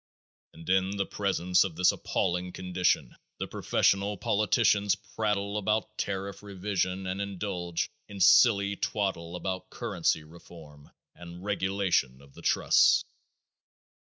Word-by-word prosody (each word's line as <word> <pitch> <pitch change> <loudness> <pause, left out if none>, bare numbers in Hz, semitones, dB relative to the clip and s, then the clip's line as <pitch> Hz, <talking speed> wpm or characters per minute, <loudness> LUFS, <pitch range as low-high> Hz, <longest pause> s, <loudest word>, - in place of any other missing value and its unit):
And 80 0 -13
in 95 +2 +1
the 100 - 0
presence 90 -3 +1
of 95 -5 -5
this 90 +2 +4
appalling 90 +1 -2
condition 90 -8 0 0.2
the - - -3
professional 100 +1 +1
politicians 105 0 +2
prattle 105 0 -2
about 105 +2 -1
tariff 100 0 -3
revision 95 -2 -2
and 95 +2 -3
indulge 95 -3 -3 0.2
in 100 -1 -9
silly 100 +1 +5
twaddle 95 -4 -2
about 95 +1 -4
currency 80 - -1
reform 75 -2 -15 0.2
and 85 +1 -11
regulation 95 -9 0
of 70 0 -18
the - - -13
trusts. - - +4
95 Hz, 120 wpm, -28 LUFS, 90-100 Hz, 0.2 s, silly